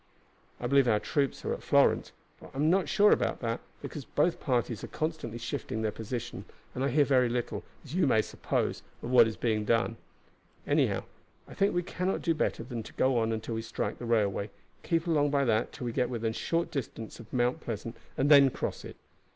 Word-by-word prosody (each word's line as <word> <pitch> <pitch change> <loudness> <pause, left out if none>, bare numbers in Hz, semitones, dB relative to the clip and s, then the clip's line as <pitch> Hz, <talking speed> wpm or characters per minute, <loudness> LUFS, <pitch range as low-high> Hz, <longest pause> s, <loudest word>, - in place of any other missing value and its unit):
I - - -5
believe 135 +1 +4
our 105 -3 +4
troops 140 +3 -1
are - - 0
at - - -6
Florence; - - +3 0.3
but - - -12
I - - -6
am 155 +3 +3
not 185 -4 +2
sure 210 0 +5
about - - +2
that, 115 -1 -1 0.2
because 150 - -6
both 165 +6 +1
parties 120 -5 -1
are - - -4
constantly 155 -8 -3
shifting 120 -3 -4
their 110 - +1
position, 115 +2 -5 0.3
and 130 - -2
I - - +2
hear 145 +3 +4
very 130 -3 +3
little, 120 0 -2 0.2
as 145 - -9
you 180 -4 +3
may 110 -4 +4
suppose, - - -2 0.2
of 120 - -4
what 120 -3 +7
is 110 - -5
being 110 -3 0
done. 115 +1 +1 0.7
Anyhow, - - +2 0.4
I - - -11
think 200 -1 +1
we 175 - +1
cannot 185 +2 -2
do 165 - +2
better 155 - -1
than 120 -2 -5
go 130 -2 +3
on 115 0 +1
until 110 +1 -3
we 115 - -2
strike 115 - -3
the 120 - -5
railway, 105 -3 +1 0.3
keep 165 0 0
along 150 -4 +2
by 140 -1 +2
that 110 -3 +1
till 125 - -7
we 120 - -1
get 125 -1 +1
within 115 -2 -1
a - - -7
short 165 +8 -1
distance 115 -5 -5
of 115 - -12
Mount 125 0 +1
Pleasant, 115 0 -5 0.2
and 140 +3 +2
then 140 -2 +8
cross - - -4
it. - - -9
125 Hz, 215 wpm, -30 LUFS, 115-145 Hz, 0.7 s, then